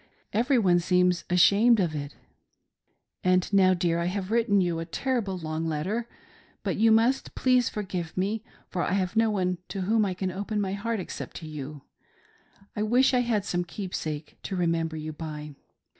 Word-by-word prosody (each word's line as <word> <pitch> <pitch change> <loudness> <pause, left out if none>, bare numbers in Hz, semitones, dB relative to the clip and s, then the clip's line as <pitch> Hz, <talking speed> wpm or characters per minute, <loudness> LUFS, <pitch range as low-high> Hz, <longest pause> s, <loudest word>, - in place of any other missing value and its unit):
Every 250 +5 +3
one 180 -6 +4
seems 180 0 +2
ashamed 205 +6 +5
of 170 -5 +1
it 145 -1 -5 1.1
And 185 +2 +2
now, 185 -1 +5
dear, 170 -1 0
I 170 - -1
have 190 +2 -3
written 225 -3 +3
you 175 -3 0
a - - -2
terrible 200 - -2
long 160 -1 -3
letter, 190 +10 -2 0.5
but - - -1
you 225 +1 +5
must 230 +4 +2
please 255 -2 +3
forgive 185 -6 -5
me, 205 +4 -1 0.2
for 180 - -3
I 180 - 0
have 190 0 0
no 225 0 +4
one 185 -4 0
to 195 - -4
whom 215 +4 +2
I 190 -3 -1
can 185 0 -2
open 205 +3 -3
my 195 -2 -1
heart 220 +2 -2
except 185 - -7
to 160 - -7
you. 145 -2 -7 0.9
I 210 - -2
wish 245 +5 +3
I 250 - +4
had 230 -5 0
some 175 -2 -1
keepsake 165 -5 -5
to 195 - -4
remember 165 -2 0
you 155 0 -5
by. 150 -1 -7
185 Hz, 180 wpm, -27 LUFS, 170-215 Hz, 1.1 s, ashamed